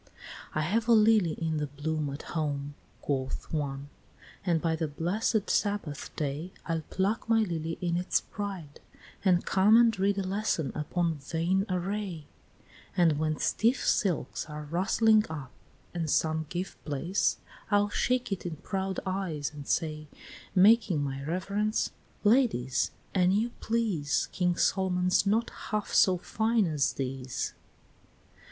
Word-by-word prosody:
VII. - - -25 0.5
"I 155 - +1
have 215 +8 0
a 235 - +6
lily 215 -6 +5
in 160 -1 -2
the 150 -1 -1
bloom 150 +1 -2
at 140 +1 -6
home," 145 -3 -2 0.3
Quoth 130 +1 -3
one, 140 -2 -3 0.5
"and 175 -4 +2
by 165 0 0
the 160 0 -1
blessed 185 +8 0
Sabbath 200 -9 -1
day 150 +4 -3
I'll 165 -1 -1
pluck 200 +4 -1
my 225 -1 +5
lily 165 -5 -2
in 170 -1 0
its 180 +1 +1
pride, 190 -8 -6 0.4
and 180 -3 +3
come 200 +4 +5
And 230 -4 +4
read 200 +1 +2
a 195 - 0
lesson 190 -5 -1
upon 165 +1 -1
vain 170 +7 0
array; 185 -3 -3 0.7
And 165 -4 +4
when 155 -1 0
stiff 240 +3 +1
silks 180 -6 0
are 150 0 -6
rustling 210 +7 +3
up, 145 -5 -6 0.4
and 165 -3 -2
some 160 +1 +1
Give 180 +1 -5
place, 165 +6 0 0.3
I'll 205 0 +3
shake 250 +2 0
it 195 - -2
in 170 -3 -4
proud 190 +4 -3
eyes 185 -6 -2
and 145 -1 -9
say 155 -1 -1 0.5
Making 195 -5 +5
my 135 -1 -4
reverence, 200 +7 -1 0.3
'Ladies, 205 - +3 0.2
an 185 -1 +3
you 225 +4 +1
please, 200 -12 0
King 180 -1 +1
Solomon's 180 0 +2
not 225 +4 +1 0.2
half 215 -1 -2
so 185 -1 +5
fine 220 +4 +1
as 150 -5 +1
these,'" 130 -2 -3
VIII. - - -32
175 Hz, 145 wpm, -29 LUFS, 155-205 Hz, 0.7 s, a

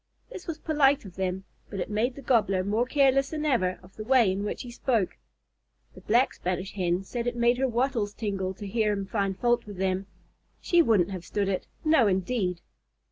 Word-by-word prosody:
This 390 -6 -9
was 325 -2 -3
polite 290 -5 +2
of 185 -3 -11
them, 190 0 -2 0.3
but 200 - -5
it - - -2
made 225 +5 0
the 280 - -10
Gobbler 210 -6 +2
more 215 +5 0
careless 275 0 +3
than 310 -1 -3
ever 185 -11 +1
of 180 - -18
the 215 - -5
way 240 -4 +4
in 195 +2 -2
which 210 - -4
he 245 - -8
spoke. 235 -5 0 0.8
The - - -13
Black 240 +4 +2
Spanish 185 +2 -3
Hen 180 -1 0
said 235 +4 -4
it 245 - -1
made 240 +1 +2
her 265 - +2
wattles 235 -4 -1
tingle 195 -4 -3
to 205 - -8
hear 210 +1 +1
him 200 -1 -3
find 195 -1 -1
fault 240 -1 +1
with 205 -2 -8
them. 190 +1 -1 0.5
She 345 -1 +4
wouldn't 200 - +3
have 185 -3 -5
stood 200 +2 -2
it 190 - -2 0.2
no, 310 -8 +5
indeed! 185 -1 0
210 Hz, 205 wpm, -27 LUFS, 190-250 Hz, 0.8 s, no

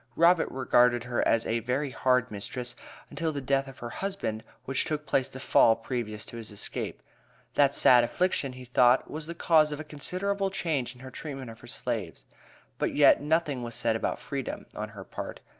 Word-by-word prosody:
Robert 170 +1 +4
regarded 125 -2 +3
her 120 -1 -1
as 115 - +2
a 115 +1 0
"very 130 +5 -1
hard 125 -2 +2
mistress" 125 +4 -5 0.4
until 160 +2 -1
the 145 - -3
death 135 +1 0
of 135 0 -11
her 120 -1 -6
husband, 190 - -3 0.2
which 135 0 0
took 150 -1 -3
place 130 -3 +1
the 130 - -9
Fall 115 -3 +5
previous 115 -2 -4
to 115 - -9
his 115 -2 -8
escape. 105 - -5 0.5
That 140 -1 +4
sad 125 -2 +6
affliction, 140 0 0
he 125 0 -10
thought, 125 +1 +4
was 155 0 -6
the 170 - -5
cause 155 -3 +4
of 150 - -4
a - - -4
considerable 195 +7 -2
change 145 -10 -2
in 125 - -16
her 130 0 -9
treatment 135 -4 -6
of 115 - -13
her - - -13
slaves. - - -4 0.5
But - - -1
yet - - +6
"nothing 150 -3 +1
was 120 -1 -6
said 115 -1 0
about 115 - -2
freedom," 135 -3 -5
on 105 0 -5
her 105 -3 -9
part. - - -7
130 Hz, 195 wpm, -28 LUFS, 120-150 Hz, 0.5 s, sad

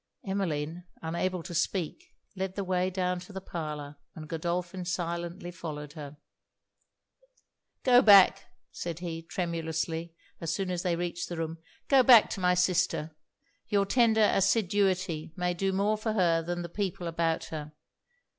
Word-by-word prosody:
Emmeline, 175 -4 -2 0.2
unable 170 +2 -2
to 175 - -7
speak, 170 0 -2 0.2
led 190 0 -3
the 200 - -2
way 185 0 0
down 180 -1 -1
to 180 - -12
the 190 - -5
parlour, 150 -5 -6 0.2
and 155 -1 -8
Godolphin 175 +3 -3
silently 175 0 -3
followed 150 -4 -7
her. 150 -1 -9 1.7
'Go 250 -1 +7
back,' 200 -5 +7 0.3
said 170 -2 -5
he, 170 -2 -5
tremulously, 165 -1 -3 0.2
as 165 - -2
soon 190 -2 -2
as 175 -1 -2
they 175 -2 0
reached 175 0 -3
the 175 - -5
room 165 0 -4 0.3
'go 270 -2 +6
back 245 -4 +7
to - - -3
my 180 -1 +3
sister; 175 -3 +1 0.5
your 200 -1 +2
tender 220 -1 +4
assiduity 185 -5 +1
may 180 0 0
do 195 +2 0
more 200 +3 +1
for 220 0 -1
her 170 -5 +3
than 175 +1 -3
the - - -4
people 185 -1 -3
about 165 -1 0
her. 150 -1 -5
175 Hz, 150 wpm, -29 LUFS, 165-190 Hz, 1.7 s, Go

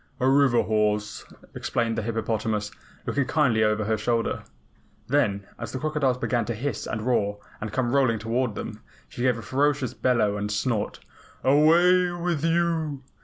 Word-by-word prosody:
"A 130 - +2
river 135 -3 +4
horse," 105 -1 0 0.3
explained 115 -1 -1
the 110 - -1
hippopotamus, 110 -1 -2 0.3
looking 140 -1 0
kindly 130 -8 +2
over 105 0 +1
her 110 +1 +1
shoulder. 115 +1 -1 0.6
Then, 105 -8 +1
as 115 -1 -5
the - - -2
crocodiles 140 -3 0
began 120 -1 0
to 120 - -3
hiss 140 +6 -3
and 110 -1 -3
roar 105 -4 +1 0.2
and 105 0 -4
come 120 +1 -1
rolling 130 -5 +3
toward 115 +1 -1
them, - - -6 0.3
she - - -8
gave 125 -2 +2
a 115 - -8
ferocious 135 +3 0
bellow 110 -5 +1
and 105 0 -3
snort. 105 0 -1 0.4
"Away 170 +6 +5
with 170 -3 -2
you! 165 -4 0
120 Hz, 160 wpm, -25 LUFS, 110-140 Hz, 0.6 s, Away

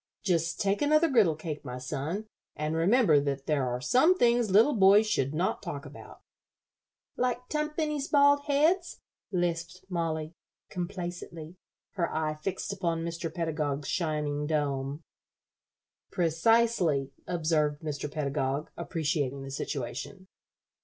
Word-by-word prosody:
Just 165 -3 0
take 200 -1 +1
another 305 +3 +4
griddle 220 - +4
cake, 155 -1 -6
my 125 0 -6
son, 145 +11 -4 0.3
and 150 +1 -2
remember 175 - +4
that 140 -1 -2
there 140 -4 +1
are 125 0 -2
some 260 - +4
things 235 - +3
little 220 +10 +5
boys 205 +1 +6
should 140 -11 0
not 170 +5 -1
talk 160 -7 -6
about." - - -12 1.0
"Like 250 0 -1
tumpany's 300 -1 -1
bald 285 0 +4
heads?" 320 +6 +2 0.3
lisped 175 0 -2
Mollie, 165 -3 -2 0.4
complacently, 175 -2 -6 0.4
her 175 -4 -2
eye 155 -1 -1
fixed 185 +6 -4
upon 170 -4 -2
Mr. 165 -1 -4
Pedagog's 150 -4 -2
shining 150 -3 -1
dome. 145 -1 -1 1.1
"Precisely," 170 -4 +2 0.2
observed 155 -3 0
Mr. 150 -1 -4
Pedagog, 140 -1 -2
appreciating 150 -5 -2
the 135 - -7
situation. 135 +8 -5
165 Hz, 120 wpm, -29 LUFS, 150-205 Hz, 1.1 s, boys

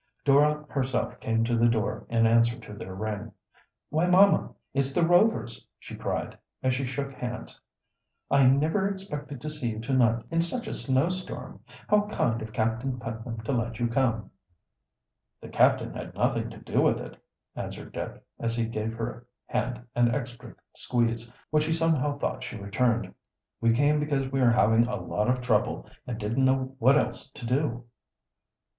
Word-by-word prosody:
Dora 150 +2 +4
herself 130 -3 -2
came 115 0 +1
to 120 +1 +1
the 115 +1 +4
door 110 -3 -1
in 115 -1 +3
answer 115 +1 +4
to 105 - -10
their 95 -2 -7
ring. 105 +2 -4 0.6
"Why, 160 +4 +2
mamma, 190 +3 +5 0.2
it's 135 -1 +1
the 170 - +3
Rovers!" 175 - +2
she - - -10
cried, - - -3 0.3
as 130 -1 +3
she 130 +1 -2
shook 135 +2 -4
hands, 125 -1 -6 0.7
"I 140 -1 +6
never 155 +9 +3
expected 150 -8 -6
to 155 - -4
see 150 -6 -3
you 110 -1 -4
to 130 +4 -3
night, 115 -3 +3
in 165 0 +2
such 235 +9 -1
a - - -4
snowstorm. 165 +8 -2 0.3
How 210 0 +3
kind 115 - 0
of 110 - -6
Captain 115 +4 -1
Putnam 115 -1 -5
to 110 - -3
let 120 -3 -1
you 120 -1 +1
come." 115 -5 0 1.1
"The - - -10
captain - - +3
had - - -7
nothing - - 0
to - - -10
do - - 0
with - - +3
it," - - -10 0.3
answered - - -6
Dick, - - -6 0.2
as 115 0 -1
he 115 -1 0
gave 110 0 -3
her 115 +1 -5 0.2
hand 120 +1 -2
an 120 0 +3
extra 120 -3 -6 0.2
squeeze, 120 -1 -1 0.2
which 155 0 +3
he 160 - +1
somehow 155 -3 +1
thought - - -2
she 125 -2 -6
returned. 115 +4 0 0.5
"We 115 0 +4
came 145 +5 +3
because 140 -3 -1
we 135 -1 +1
were 125 - +6
having 115 0 +4
a 125 - -2
lot 105 +3 -1
of 125 0 +1
trouble, 110 -4 +1 0.2
and 120 -3 -3
didn't 115 +5 0
know 130 0 +1
what 130 +4 +6
else 125 -1 -2
to 135 -2 -10
do." 125 -1 0
125 Hz, 175 wpm, -27 LUFS, 115-145 Hz, 1.1 s, I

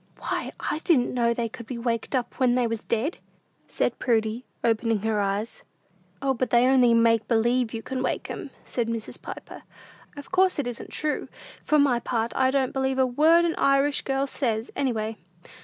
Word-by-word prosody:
"Why, - - -3
I 305 - -2
didn't 290 -7 +2
know 235 -1 +2
they 235 0 -1
could 235 0 -10
be 250 - -5
waked 235 +2 -2
up 250 -2 -3
when 250 -2 +3
they 250 -1 +2
was 230 -1 -3
dead," 235 +9 -1 0.5
said - - -1
Prudy, 225 0 0 0.2
opening 225 -2 +1
her 220 -1 +1
eyes. 200 +3 -2 0.6
"O, 270 -1 +2
but 255 0 -2
they 240 +1 +4
only 255 -3 +5
make 230 -1 +3
believe 235 +1 +2
you 225 -1 -5
can 260 -1 -3
wake - - -2
'em," - - -6 0.2
said 240 -2 -2
Mrs. 230 -1 -5
Piper; - - -9 0.6
"of 285 - -10
course 370 0 +3
it 290 - -1
isn't 245 -1 -6
true! 305 -1 -2 0.4
For 305 - +3
my 275 -5 +3
part, 230 -1 -2
I 260 -1 +3
don't 265 -1 0
believe 265 0 0
a 260 - +4
word 315 +7 +4
an 335 - +1
Irish 275 +1 +3
girl 270 0 0
says, 230 -5 -2
any 270 -2 +1
way." 220 -1 -3
245 Hz, 190 wpm, -25 LUFS, 230-270 Hz, 0.6 s, only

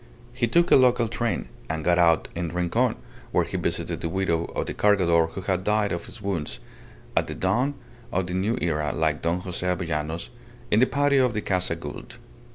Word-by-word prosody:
He 120 -1 0
took 170 +8 +3
a - - +9
local 125 -2 +4
train, 115 -3 -2 0.2
and 80 0 -2
got 90 0 +3
out 85 -2 +4
in 85 -1 -3
Rincon, 90 0 +1 0.4
where - - +2
he - - -6
visited - - -2
the 85 - -2
widow 85 -3 0
of - - -3
the - - -4
Cargador 85 -5 +3
who 95 - -7
had 95 -1 -1
died 105 0 +1
of 85 - -3
his 110 - -9
wounds 80 -11 -3 0.6
(at - - +2
the - - -5
dawn 120 +10 +1 0.4
of 95 0 0
the 90 - -5
New 100 +5 0
Era, 75 -3 -1
like 80 -1 0
Don 85 +2 0
Jose 90 -1 -4
Avellanos) 85 -3 -2 0.4
in 105 - +5
the 130 - +5
patio 140 -1 +3
of 125 -3 +1
the 105 - 0
Casa 90 -4 0
Gould. 75 -3 -9
90 Hz, 200 wpm, -25 LUFS, 85-105 Hz, 0.6 s, a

